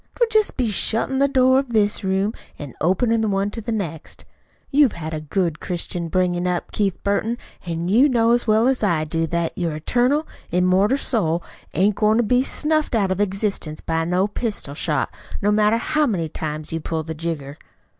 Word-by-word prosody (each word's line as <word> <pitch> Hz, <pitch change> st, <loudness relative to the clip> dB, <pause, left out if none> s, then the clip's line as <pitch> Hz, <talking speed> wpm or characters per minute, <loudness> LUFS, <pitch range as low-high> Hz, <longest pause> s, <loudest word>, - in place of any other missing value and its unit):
'Twould 475 Hz, -2 st, +1 dB
jest 435 Hz, -1 st, +2 dB
be 255 Hz, -, +1 dB
shuttin' 230 Hz, +4 st, +1 dB
the 280 Hz, -, +4 dB
door 260 Hz, -1 st, +4 dB
of 270 Hz, -3 st, -4 dB
this 210 Hz, -2 st, +2 dB
room 190 Hz, +3 st, 0 dB, 0.2 s
an' 145 Hz, -5 st, -8 dB
openin' 220 Hz, +8 st, +2 dB
the 220 Hz, -, +1 dB
one 200 Hz, 0 st, 0 dB
to 225 Hz, -, -6 dB
the 230 Hz, -, -4 dB
next. 170 Hz, -8 st, -5 dB, 0.5 s
You've 280 Hz, -4 st, +4 dB
had 160 Hz, -1 st, -6 dB
a 155 Hz, -, -3 dB
good 165 Hz, 0 st, -1 dB
Christian 175 Hz, -1 st, -3 dB
bringin' 180 Hz, +1 st, 0 dB
up, 180 Hz, -1 st, -2 dB
Keith 200 Hz, -3 st, 0 dB
Burton, 215 Hz, +4 st, 0 dB, 0.3 s
an' 170 Hz, 0 st, -2 dB
you 240 Hz, +10 st, +5 dB
know 230 Hz, -2 st, +3 dB
as 240 Hz, 0 st, +2 dB
well 220 Hz, +2 st, +4 dB
as 265 Hz, -1 st, +1 dB
I 170 Hz, -7 st, +1 dB
do 165 Hz, +1 st, -1 dB
that 170 Hz, 0 st, -2 dB
your 170 Hz, -4 st, -2 dB
eternal, 250 Hz, -, +1 dB, 0.2 s
immoral 185 Hz, +7 st, +3 dB
soul 175 Hz, -, 0 dB, 0.3 s
ain't 200 Hz, +2 st, +2 dB
goin' 215 Hz, +1 st, +3 dB
to 240 Hz, -, +3 dB
be 250 Hz, +3 st, +3 dB
snuffled 305 Hz, 0 st, 0 dB
out 200 Hz, -4 st, +1 dB
of 190 Hz, +2 st, 0 dB
existence 195 Hz, -6 st, -2 dB
by 165 Hz, 0 st, -1 dB
no 180 Hz, +4 st, +1 dB
pistol 210 Hz, -, -3 dB
shot, 145 Hz, -4 st, -1 dB, 0.3 s
no 205 Hz, -, +1 dB
matter 210 Hz, +1 st, +3 dB
how 300 Hz, +5 st, +1 dB
many 180 Hz, -9 st, -1 dB
times 155 Hz, 0 st, -5 dB
you 165 Hz, -, -1 dB
pull 160 Hz, 0 st, -3 dB
the 160 Hz, +1 st, -5 dB
jigger." 155 Hz, -3 st, -5 dB
195 Hz, 195 wpm, -22 LUFS, 165-230 Hz, 0.5 s, you